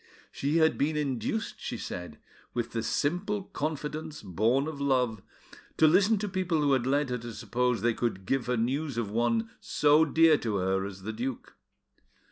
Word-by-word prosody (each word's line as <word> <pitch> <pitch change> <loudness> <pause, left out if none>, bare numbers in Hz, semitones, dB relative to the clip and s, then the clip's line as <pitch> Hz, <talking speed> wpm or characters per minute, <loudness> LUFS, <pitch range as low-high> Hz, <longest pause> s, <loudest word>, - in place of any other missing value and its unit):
She 145 +4 0
had 160 -1 +3
been 150 +2 +1
induced, 150 - -2
she - - -4
said, 90 0 -6 0.4
with 120 -1 -2
the 115 - -2
simple 185 - -1
confidence 155 - -4
born 110 - +1
of 150 -3 -6
love, 125 -6 +1 0.6
to 160 - +6
listen 195 +7 +5
to 205 +1 -2
people 185 -4 0
who 145 -2 +3
had 130 -2 +1
led 140 0 +1
her 125 - -1
to 120 0 -7
suppose 125 +2 -1
they 120 0 +3
could 110 -5 -2
give 135 +1 0
her 125 -1 +1
news 135 +3 -1
of 110 -4 -2
one 115 0 0
so 150 +1 +4
dear 160 0 +5
to 110 -3 -2
her 95 0 0
as 95 -1 -10
the 110 +2 -4
duke. 125 +3 -5
135 Hz, 180 wpm, -29 LUFS, 115-155 Hz, 0.6 s, to